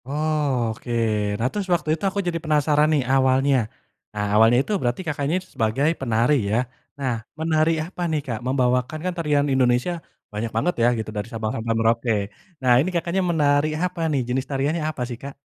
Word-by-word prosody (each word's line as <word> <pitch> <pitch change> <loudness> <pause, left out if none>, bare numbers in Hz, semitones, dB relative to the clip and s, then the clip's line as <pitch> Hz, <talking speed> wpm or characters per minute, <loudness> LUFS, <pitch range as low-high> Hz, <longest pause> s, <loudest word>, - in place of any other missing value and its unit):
Oh, 145 -5 0
oke, 120 +2 -9 0.5
nah 115 - 0
terus 205 -2 -3
waktu 165 -3 -1
itu 160 - -5
aku 200 - -3
jadi 170 -1 -1
penasaran 150 -1 +3
nih 145 - +3
awalnya, 135 +1 +3 0.6
eee, 105 0 -1
awalnya 115 +3 +6
itu 150 - -6
berarti 120 +6 -1
Kakaknya 145 +1 -1 0.2
sebagai 115 +6 +1
penari 120 +2 +2
ya? 110 - +1 0.4
Nah, 130 -3 0 0.3
menari 160 0 +2
apa 180 +1 -9
nih, 155 - +1
Kak? 115 -4 -3
Membawakan 125 +2 +1
kan 185 - -1
tarian 150 -3 +1
Indonesia 125 +4 +2 0.4
banyak 110 +2 -3
banget 180 - +1
ya - - +5
gitu 110 -1 -4
dari 105 - -3
Sabang 110 -1 -3
sampai 115 0 -1
Merauke. 115 +1 +2 0.5
Nah 130 -1 +2
ini 170 - -1
Kakaknya 170 +2 0
menari 145 -2 +3 0.2
apa 180 -1 -2
nih, 140 -3 +1
jenis 130 +2 -1
tariannya 145 +4 -1
apa 145 -5 -6
sih, 120 - -5
Kak? 140 0 -6
140 Hz, 180 wpm, -23 LUFS, 120-155 Hz, 0.6 s, awalnya